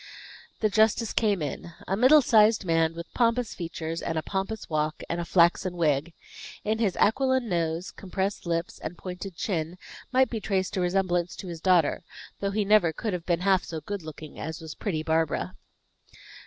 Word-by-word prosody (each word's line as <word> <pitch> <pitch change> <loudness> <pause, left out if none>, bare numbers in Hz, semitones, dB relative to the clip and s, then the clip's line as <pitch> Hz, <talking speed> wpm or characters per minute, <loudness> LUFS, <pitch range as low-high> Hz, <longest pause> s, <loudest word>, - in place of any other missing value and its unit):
The 215 - +3
justice 220 +1 +3
came 205 -7 +1
in. 165 +3 -5
A 195 - +1
middle 260 +7 +6
sized 215 -3 +4
man, 165 -1 +2
with 170 0 -8
pompous 235 -1 +1
features, 165 -1 -5
and 165 - -2
a 160 - -1
pompous 195 +3 -3
walk, 155 0 -1
and 170 +1 -2
a - - -4
flaxen 175 +1 +3
wig. 155 -1 +1 0.5
In 220 +1 0
his 210 -5 +1
aquiline 260 +2 +2
nose, 170 -1 -1
compressed 195 0 -3
lips, 170 0 -2
and 170 - -6
pointed 180 0 -7
chin, 170 -2 -2 0.3
might 260 0 +3
be 225 - -2
traced 190 -3 -1
a 185 - 0
resemblance 180 -1 0
to 190 - -8
his 165 -2 -7
daughter; 180 -3 +3 0.4
though 200 - -1
he 205 +1 0
never 205 -5 +5
could 215 +5 -3
have 175 -2 -5
been 170 -1 +1
half 190 -1 +3
so 165 -1 -5
good 200 +4 -5
looking 155 -1 -10
as 160 +1 -5
was 160 -2 -8
pretty 160 -7 -3
Barbara. 160 - 0
180 Hz, 180 wpm, -27 LUFS, 165-210 Hz, 0.5 s, middle